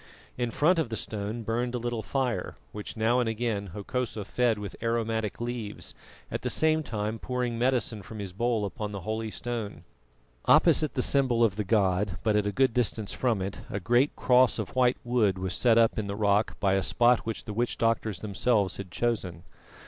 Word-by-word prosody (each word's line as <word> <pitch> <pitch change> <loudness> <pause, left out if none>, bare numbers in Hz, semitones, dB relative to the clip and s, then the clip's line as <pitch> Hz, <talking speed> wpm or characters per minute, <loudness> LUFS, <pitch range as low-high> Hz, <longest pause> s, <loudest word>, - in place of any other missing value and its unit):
In 120 -1 -1
front 165 +8 +3
of 155 - -1
the 115 - -3
stone 110 +2 -4
burned 120 +3 -1
a - - 0
little 120 -1 -3
fire, 130 -1 -2 0.2
which 105 +2 -7
now 115 +3 +2
and 120 -2 +1
again 110 -3 -2
Hokosa 105 +3 -4
fed 120 0 +1
with 105 -2 -6
aromatic 115 -2 -1
leaves, 120 -3 -5 0.4
at - - -3
the - - -2
same 155 0 +2
time 110 -5 -3
pouring 125 -2 -2
medicine 120 -4 0
from 110 +3 -10
his 100 -3 -6
bowl 115 +1 0
upon 105 0 -5
the 100 - -5
holy 110 +3 -3
stone. 115 -2 -5 0.6
Opposite 155 -2 +4
the 125 - +2
symbol 130 -4 +3
of 105 -4 +2
the 105 - -1
god, 95 -2 +1
but 110 -2 +2
at 105 -1 +2
a - - 0
good 130 +4 +2
distance 115 -3 0
from 115 -7 0
it, 95 +1 -5
a 100 - -3
great 120 +9 +2
cross 125 -1 +4
of 110 0 -5
white 125 -1 +3
wood 115 -6 +2
was 95 -1 -2
set 115 +3 +3
up 115 -1 +4
in 105 - -3
the 100 - -3
rock 105 0 +1
by 95 -1 +2
a 95 - +2
spot 120 +4 +3
which 115 - -4
the 105 - -5
witch 120 +3 -1
doctors 115 -4 0
themselves 105 -1 +1
had 100 -2 -7
chosen. 95 -6 -2
115 Hz, 200 wpm, -28 LUFS, 105-120 Hz, 0.6 s, Opposite